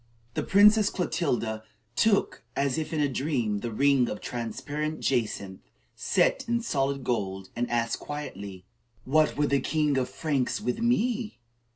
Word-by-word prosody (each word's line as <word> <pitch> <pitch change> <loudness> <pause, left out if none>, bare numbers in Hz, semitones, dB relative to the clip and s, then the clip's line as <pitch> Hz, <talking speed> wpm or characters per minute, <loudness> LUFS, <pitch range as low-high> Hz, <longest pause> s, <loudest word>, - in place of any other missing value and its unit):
The - - -1
Princess 210 +1 +6
Clotilda 120 - -1 0.3
took, 210 - +2
as 140 +1 +1
if 155 - -4
in 155 -2 0
a 145 - +3
dream, 130 -6 -1
the 120 - -4
ring 135 +1 +3
of 105 - -4
transparent 145 +6 -4
jacinth 105 -7 -1 0.4
set - - +2
in 235 0 +1
solid 140 - -1
gold, 95 -6 -2
and 120 +1 -1
asked 115 -1 0
quietly: 100 -11 -7 0.4
"What 155 +3 +3
would 145 -1 +1
the 140 - +4
king 150 +3 0
of 125 - -1
the - - -15
Franks 145 -6 -1
with 125 - -2
me?" 235 -1 0
140 Hz, 155 wpm, -27 LUFS, 120-155 Hz, 0.4 s, Princess